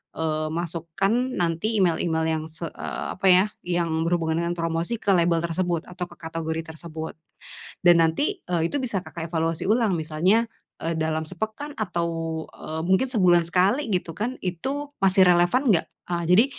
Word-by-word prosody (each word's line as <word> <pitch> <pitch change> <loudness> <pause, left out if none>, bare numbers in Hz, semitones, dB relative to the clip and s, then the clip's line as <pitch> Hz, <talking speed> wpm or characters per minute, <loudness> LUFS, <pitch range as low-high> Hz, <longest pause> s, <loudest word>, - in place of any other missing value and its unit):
eee, 155 -1 -1
masukkan 170 +3 -2 0.2
nanti 175 +6 0
email-email 165 -2 +1 0.2
yang - - -6
se 160 +1 -7
eee, - - -5
apa 195 - +2
ya, 185 +1 +7 0.2
yang 165 -2 0
berhubungan 165 -2 +1
dengan 170 0 -1
promosi 165 +5 -1
ke 205 -3 0
label 170 -2 +3
tersebut 170 0 -1
atau 180 -1 -4
ke - - -15
kategori 160 0 -4
tersebut. 160 -1 -6 0.7
Dan 175 -1 +6
nanti, 295 - -1
eee, 170 -2 0
itu 290 - -1
bisa, 230 -8 -2
Kakak 165 -2 -6
evaluasi 165 -1 -1
ulang, 215 -4 +2
misalnya, 170 +9 +2 0.3
eee, 165 +1 -1
dalam 160 0 -1
sepekan 220 - -5
atau, 175 -5 -1 0.5
eee, 160 +1 -5
mungkin 190 +8 +3
sebulan 180 -7 +4
sekali, 200 +9 +2
gitu 180 -3 -1
kan, 240 +5 -2
itu 270 - -3
masih 190 -1 +5
relevan 180 +10 +3
enggak? 165 - +1 0.2
Eee, 175 -1 -1
jadi 195 +6 +7
175 Hz, 165 wpm, -25 LUFS, 165-195 Hz, 0.7 s, ya